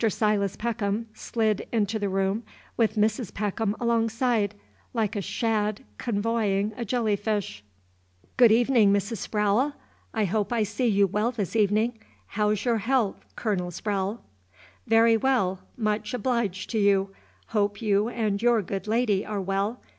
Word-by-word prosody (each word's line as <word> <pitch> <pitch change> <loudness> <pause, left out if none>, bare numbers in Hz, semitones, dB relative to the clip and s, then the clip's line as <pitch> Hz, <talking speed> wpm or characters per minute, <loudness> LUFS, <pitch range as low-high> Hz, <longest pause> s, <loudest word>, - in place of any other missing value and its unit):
Silas 205 -2 +1
Peckham 220 -1 -2
slid 220 -2 -1
into 220 -1 0
the 205 -1 -1
room 195 +3 0 0.3
with 225 -1 +1
Mrs. 215 0 0
Peckham 210 +1 -1
alongside, 230 -2 +1 0.4
like 225 -1 0
a 205 - -1
shad 215 -1 -1 0.2
convoying 210 -2 0
a 240 - -4
jelly 225 -2 +1
fish. 200 - -3 0.7
"Good 240 -3 +6
evenin', 230 -2 +4
Mrs. 200 +3 0
Sprowle! 210 +7 +2 0.4
I 220 -2 0
hope 205 +3 -1
I 235 -2 +2
see 210 +4 -1
you 200 -2 +4
well 210 +4 0
this 215 -4 -4
evenin'. 220 +2 +2 0.3
How 210 0 +1
's 210 +1 -2
your 235 -2 +2
haalth, 230 -2 +1 0.2
Colonel 190 -6 -1
Sprowle?" 200 +4 -2 0.7
"Very 225 0 +5
well, 220 -7 +1 0.2
much 215 -1 -1
obleeged 225 -6 -1
to 225 - 0
you. 200 -1 +3 0.4
Hope 205 -2 0
you 210 0 +1
and 215 -4 -1
your 235 -3 +3
good 195 +2 -5
lady 215 -3 +1
are 210 -1 -3
well. 195 +5 -2
215 Hz, 145 wpm, -26 LUFS, 200-230 Hz, 0.7 s, Good